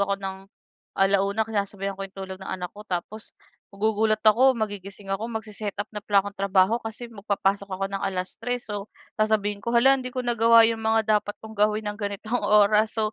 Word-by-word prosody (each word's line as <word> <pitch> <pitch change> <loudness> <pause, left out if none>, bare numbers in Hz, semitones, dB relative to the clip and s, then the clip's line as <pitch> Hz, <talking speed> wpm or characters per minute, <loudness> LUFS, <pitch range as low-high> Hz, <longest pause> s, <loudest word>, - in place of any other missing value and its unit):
ako 200 0 +1
ng 195 -1 -5 0.6
1:00 200 +2 +2
sinasabayan 200 -2 -3
ko 195 - -7
yung 190 - -36
tulog 190 -1 -7
ng - - -8
anak 180 -1 -5
ko, 210 - -11
tapos 195 +5 -5 0.3
magugulat 215 +1 +1
ako 255 +4 +6
magigising 200 -2 -5
ako, 220 +4 -3
mag-se-setup 215 -2 -4
na 210 - -4
pala 205 -2 +3
ako - - -3
ng - - -52
trabaho 195 +2 +3
kasi 225 +2 -6
mag 220 -4 -13
papasok 200 0 0
ako 190 +1 -2
ng 195 0 -5
3:00. 195 +6 -3
So 205 -1 -5 0.3
sasabihin 210 -1 +1
ko, 235 - -3
"Hala, 265 +3 +6
hindi 255 - -5
ko 255 0 -4
nagawa 230 -1 +6
'yong 225 -1 -1
mga 220 0 +3 0.2
dapat 205 0 -7
kong 220 0 -9
gawin 210 +1 +1
ng 210 +1 -4
ganitong 205 +3 -3
oras." 210 +1 +4
So, 215 0 0
210 Hz, 195 wpm, -25 LUFS, 195-220 Hz, 0.6 s, ako